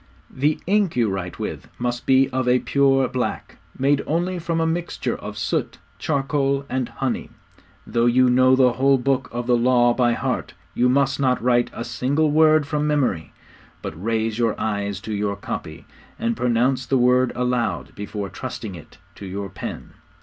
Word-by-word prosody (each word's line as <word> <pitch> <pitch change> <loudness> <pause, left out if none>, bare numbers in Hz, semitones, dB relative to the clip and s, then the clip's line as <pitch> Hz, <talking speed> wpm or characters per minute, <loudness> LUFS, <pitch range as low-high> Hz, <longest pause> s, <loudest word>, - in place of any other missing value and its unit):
'The 145 +4 0
ink 200 -2 +1
you 120 -2 +2
write 90 -2 -4
with - - -5
must 120 0 -3
be 135 0 +5
of 130 -1 -1
a 125 0 +5
pure 135 0 +2
black, 125 -1 -4 0.2
made 140 +1 +2
only 175 +3 -1
from 165 0 -2
a 165 - +1
mixture 170 +2 -2
of - - -8
soot, - - -2 0.2
charcoal, 140 -1 0
and 130 -2 -1
honey. 135 -3 -3 0.6
Though 120 0 +1
you 125 +1 +4
know 130 +1 +5
the 130 -2 +4
whole 135 +2 +3
Book 130 0 0
of 120 0 -4
the 120 0 +3
Law 120 0 +4
by 120 -1 +2
heart, - - -3 0.2
you 125 +1 +2
must 135 0 +2
not 130 -2 +2
write 120 0 +2
a 120 - -6
single 135 +6 0
word 155 0 +5
from 150 +1 -1
memory, 130 - 0 0.5
but 80 +4 -7
raise 115 0 -1
your 115 -2 0
eyes 100 -2 -2
to 110 - -5
your 100 0 -1
copy, 80 -5 -7 0.3
and 235 +1 -1
pronounce 125 - +1
the 135 - +2
word 125 0 +3
aloud 125 -1 -1
before 105 0 -5
trusting 100 +3 -6
it 85 -4 -13 0.2
to 100 - -9
your 100 +1 -5
pen. - - -7
125 Hz, 175 wpm, -22 LUFS, 115-140 Hz, 0.6 s, be